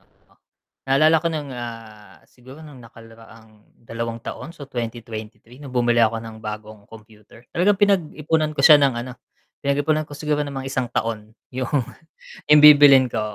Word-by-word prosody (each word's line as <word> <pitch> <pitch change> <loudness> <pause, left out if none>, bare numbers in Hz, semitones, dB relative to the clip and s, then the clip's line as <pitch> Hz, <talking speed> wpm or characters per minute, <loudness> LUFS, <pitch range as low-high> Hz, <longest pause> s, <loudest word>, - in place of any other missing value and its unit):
oo. - - -34 0.8
Naalala 155 +4 +4
ko 170 - -1
nung, 150 -4 -5
ah, 115 -3 -10
siguro 130 +5 -16
nung 145 -4 -13
nakaraang 115 -1 -17 0.2
2 115 0 -6
taon - - -8
so 145 - -9
2023 115 -1 -8
nung 140 -2 -10
bumili 120 -1 +2
ako 115 0 +2
ng 110 -1 -10
bagong 105 -1 -9
computer, 110 +1 -17
talagang 195 +4 +2
pinag-ipunan 160 -6 0
ko 140 - +1
siya 150 -2 +8
ng 140 -2 +3
ano, 130 - -9 0.5
pinag-ipunan 145 +2 -1
ko 145 - -10
siguro 150 0 -2
ng 145 -1 -4
mga 135 0 -6
1 130 -3 -2
taon 110 -1 -5 0.2
yung, 130 -1 -4 0.8
bibilhin 145 -3 +7
ko, 110 - -2
125 Hz, 155 wpm, -21 LUFS, 115-150 Hz, 0.8 s, siya